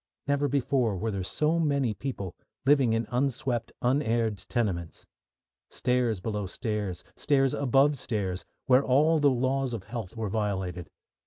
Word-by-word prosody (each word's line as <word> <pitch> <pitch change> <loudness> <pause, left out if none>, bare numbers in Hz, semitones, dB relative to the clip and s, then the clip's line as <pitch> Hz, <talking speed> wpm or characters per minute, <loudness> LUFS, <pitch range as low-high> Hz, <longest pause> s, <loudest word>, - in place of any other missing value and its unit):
Never 145 0 +1
before 130 -6 +1
were 110 +4 -2
there 100 -2 -3
so 155 - +1
many 140 -7 +1
people 100 -5 -5 0.3
living 135 -5 +4
in 115 +1 0
unswept, 125 -2 -1
unaired 120 -5 +1
tenements. 95 -9 -2 0.6
Stairs 125 -5 0
below 105 0 -3
stairs, 105 -3 -3
stairs 135 -2 +2
above 140 +2 +3
stairs, 95 -7 -2 0.2
where 130 +1 +5
all 150 +5 +4
the 145 -1 +5
laws 130 0 0
of 110 -5 -4
health 115 -2 -7
were 110 -2 -2
violated. 95 -5 -2
120 Hz, 140 wpm, -28 LUFS, 105-135 Hz, 0.6 s, where